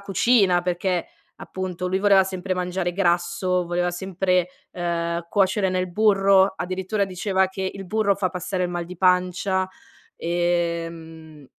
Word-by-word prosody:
cucina, 200 Hz, -2 st, +3 dB
perché 180 Hz, 0 st, -1 dB, 0.3 s
appunto 185 Hz, -1 st, -5 dB
lui 190 Hz, +1 st, 0 dB
voleva 195 Hz, -1 st, +5 dB
sempre 185 Hz, 0 st, -4 dB
mangiare 180 Hz, 0 st, -2 dB
grasso, 175 Hz, 0 st, 0 dB
voleva 175 Hz, +1 st, 0 dB
sempre, 180 Hz, 0 st, 0 dB, 0.2 s
ehm, 170 Hz, -1 st, -2 dB
cuocere 195 Hz, -1 st, +2 dB
nel 185 Hz, -1 st, -1 dB
burro, 195 Hz, -1 st, +4 dB
addirittura 190 Hz, +3 st, -2 dB
diceva 190 Hz, +1 st, 0 dB
che 190 Hz, 0 st, -3 dB
il 195 Hz, -1 st, -8 dB
burro 215 Hz, 0 st, +1 dB
fa 190 Hz, -1 st, -1 dB
passare 180 Hz, +1 st, -3 dB
il 180 Hz, -, -1 dB
mal 175 Hz, -1 st, -3 dB
di 180 Hz, +1 st, -10 dB
pancia, 185 Hz, +1 st, +2 dB, 0.5 s
e 170 Hz, -1 st, 0 dB
mhmm 160 Hz, -3 st, -13 dB
180 Hz, 140 wpm, -23 LUFS, 175-190 Hz, 0.5 s, voleva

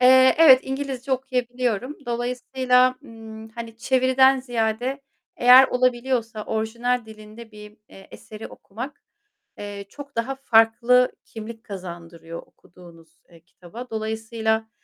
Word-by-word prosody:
eee, 260 Hz, +1 st, +6 dB
evet, 275 Hz, -6 st, +8 dB
İngilizce 265 Hz, -1 st, -4 dB
okuyabiliyorum. 250 Hz, -1 st, -2 dB
Dolayısıyla, 250 Hz, +1 st, +1 dB
ımm, 220 Hz, -2 st, -11 dB
hani, 225 Hz, 0 st, -9 dB
çeviriden 260 Hz, +2 st, +3 dB
ziyade 245 Hz, +2 st, -2 dB, 0.3 s
eğer 255 Hz, +2 st, +7 dB
olabiliyorsa 245 Hz, -3 st, -1 dB
orijinal 235 Hz, +2 st, -2 dB
dilinde 220 Hz, +1 st, -13 dB
bir, 210 Hz, 0 st, -13 dB
eee, 195 Hz, -, -15 dB
eseri 215 Hz, 0 st, -10 dB
okumak, 250 Hz, +8 st, -9 dB, 0.6 s
eee, 205 Hz, -1 st, -7 dB
çok 280 Hz, 0 st, -12 dB
daha 235 Hz, +4 st, -2 dB
farklı 240 Hz, 0 st, +3 dB
kimlik 225 Hz, 0 st, -10 dB
kazandırıyor 170 Hz, -4 st, -9 dB
okuduğunuz, 165 Hz, -2 st, -19 dB
eee, 170 Hz, -1 st, -18 dB
kitaba. 185 Hz, +8 st, -12 dB
Dolayısıyla, 220 Hz, 0 st, -2 dB
235 Hz, 110 wpm, -23 LUFS, 220-255 Hz, 0.6 s, evet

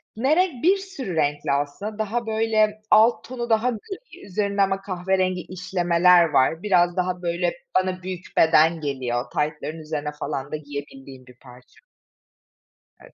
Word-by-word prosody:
Ne 265 Hz, +7 st, +2 dB
renk? 345 Hz, -9 st, 0 dB
Bir 375 Hz, +4 st, +5 dB
sürü 380 Hz, -, -6 dB
renkli 145 Hz, -2 st, 0 dB
aslında, 145 Hz, +10 st, -2 dB
daha 225 Hz, +3 st, -2 dB
böyle 220 Hz, -1 st, +1 dB
alt 220 Hz, +3 st, +5 dB
tonu 240 Hz, -1 st, -6 dB
daha 225 Hz, +2 st, +2 dB
gri, 365 Hz, -, -8 dB
üzerinde 200 Hz, +1 st, -1 dB
ama 195 Hz, 0 st, +1 dB
kahverengi 185 Hz, -1 st, -1 dB
işlemeler 180 Hz, -1 st, +3 dB
var, 150 Hz, +4 st, +2 dB
biraz 175 Hz, -4 st, +3 dB
daha 180 Hz, 0 st, -1 dB
böyle 175 Hz, 0 st, -1 dB, 0.2 s
bana 185 Hz, -1 st, -1 dB
büyük 185 Hz, -1 st, -6 dB
beden 160 Hz, 0 st, +4 dB
geliyor, 130 Hz, -4 st, -2 dB
taytların 150 Hz, +1 st, -2 dB
üzerine 150 Hz, -1 st, -4 dB
falan 140 Hz, -1 st, -4 dB
da -, -, -2 dB
giyebildiğim 140 Hz, -3 st, -9 dB
bir 125 Hz, 0 st, -17 dB
parça. 125 Hz, -, -17 dB, 1.2 s
Evet. -, -, -17 dB
180 Hz, 145 wpm, -23 LUFS, 150-215 Hz, 1.2 s, Bir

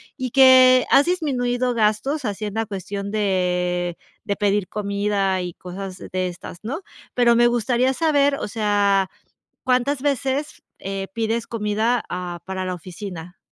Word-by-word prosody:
y 255 Hz, -3 st, -4 dB
que 255 Hz, -1 st, +7 dB
has 280 Hz, -, +6 dB
disminuido 255 Hz, -8 st, 0 dB
gastos 230 Hz, +7 st, 0 dB
haciendo 210 Hz, +1 st, -2 dB
cuestión 200 Hz, 0 st, -5 dB
de 180 Hz, -4 st, 0 dB, 0.3 s
de 200 Hz, -, -2 dB
pedir 205 Hz, -2 st, +1 dB
comida 200 Hz, -2 st, -1 dB
y 175 Hz, -1 st, -5 dB
cosas 185 Hz, +1 st, -8 dB
de 185 Hz, -1 st, -3 dB
estas, 175 Hz, 0 st, -10 dB
¿no?, 255 Hz, +9 st, -3 dB, 0.3 s
pero 240 Hz, -1 st, +4 dB
me 240 Hz, +1 st, +5 dB
gustaría 240 Hz, +2 st, +1 dB
saber, 285 Hz, -1 st, +2 dB
o -, -, -4 dB
sea, 205 Hz, -2 st, +1 dB, 0.5 s
¿cuántas 255 Hz, +2 st, +1 dB
veces, 280 Hz, +1 st, -1 dB, 0.2 s
eh, 195 Hz, 0 st, -4 dB
pides 230 Hz, 0 st, -1 dB
comida 220 Hz, +1 st, 0 dB
a 175 Hz, -1 st, -5 dB
para 190 Hz, 0 st, -4 dB
la 185 Hz, 0 st, -2 dB
oficina? 180 Hz, 0 st, -9 dB
210 Hz, 140 wpm, -22 LUFS, 190-250 Hz, 0.5 s, que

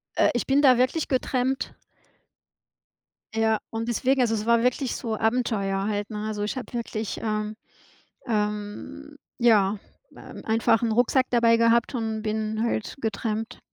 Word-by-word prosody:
Äh, -, -, +4 dB
ich 240 Hz, -, -2 dB
bin 275 Hz, +2 st, +4 dB
da 255 Hz, -4 st, +6 dB
wirklich 255 Hz, +6 st, +1 dB
getrampt. 260 Hz, 0 st, -1 dB, 1.6 s
Ja, 220 Hz, -1 st, +2 dB
und 225 Hz, +1 st, -4 dB
deswegen, 260 Hz, +3 st, +1 dB
also, 230 Hz, -2 st, +2 dB
es 215 Hz, -1 st, -2 dB
war 235 Hz, 0 st, +4 dB
wirklich 250 Hz, +1 st, 0 dB
so 225 Hz, -2 st, -3 dB
Abenteuer 220 Hz, -4 st, 0 dB
halt, 205 Hz, 0 st, -2 dB
ne? 215 Hz, 0 st, -4 dB
Also 210 Hz, -1 st, -3 dB
ich 215 Hz, -, -3 dB
habe 255 Hz, -, -7 dB
wirklich, 225 Hz, -2 st, -4 dB
ähm 215 Hz, -1 st, -2 dB, 0.7 s
ähm 215 Hz, +7 st, -3 dB, 0.2 s
ja, 210 Hz, -4 st, +3 dB, 0.4 s
ähm, -, -, -11 dB
einfach 225 Hz, 0 st, +2 dB
'n 230 Hz, -, 0 dB
Rucksack 245 Hz, +3 st, +3 dB
dabei 230 Hz, -1 st, +4 dB
gehabt 230 Hz, +2 st, +3 dB
und 220 Hz, -3 st, -2 dB
bin 220 Hz, 0 st, -2 dB
halt 220 Hz, -2 st, -2 dB
getrampt. 220 Hz, 0 st, -3 dB
225 Hz, 150 wpm, -25 LUFS, 215-245 Hz, 1.6 s, da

